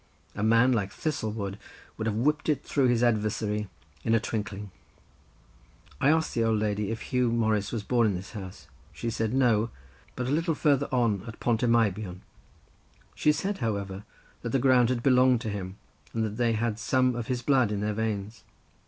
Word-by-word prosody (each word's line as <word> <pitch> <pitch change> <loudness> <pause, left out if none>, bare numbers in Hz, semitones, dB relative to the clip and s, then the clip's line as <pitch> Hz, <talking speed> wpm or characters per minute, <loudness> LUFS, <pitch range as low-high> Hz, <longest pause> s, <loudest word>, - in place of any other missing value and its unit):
A - - -5
man 115 +4 +4
like 105 -5 0
Thistlewood 110 -10 -3 0.4
would 110 - -3
have 105 - 0
whipped 150 +8 +1
it 150 - +1
through 135 -3 +1
his 120 -1 +2
adversary 105 -2 0 0.4
in 115 - +2
a - - +4
twinkling. 105 -2 -4 1.3
I 140 - +4
asked 160 +1 +2
the 115 - +1
old 110 -1 +2
lady 105 -1 -1
if 115 0 -5
Huw 125 -1 +2
Morris 110 -3 +1
was 115 -3 -3
born 120 0 +2
in 100 - 0
this 90 +2 -7
house; 95 -3 -8 0.3
she 115 - -4
said 110 0 -1
no, 120 -4 +3 0.5
but 125 - -3
a 130 - -2
little 165 +2 +1
farther 140 -2 +2
on 115 -7 +1
at 115 - -9
Pont 115 -2 +1
y 125 - +2
Meibion; 105 -5 +1 0.9
she 150 - +3
said, 195 +6 -2
however, 100 -3 -3 0.4
that 120 - -4
the 135 - +2
ground 125 -2 +4
had 120 -2 -1
belonged 130 -2 +4
to 110 - -3
him, 95 -1 -5 0.4
and 110 -1 +1
that 105 0 -5
they 120 -2 +2
had 110 0 -1
some 130 +2 +2
of 120 -2 -4
his 125 -1 -2
blood 130 -5 +3
in 100 -1 -2
their 105 0 -1
veins. 105 -1 -3
115 Hz, 190 wpm, -28 LUFS, 105-125 Hz, 1.3 s, man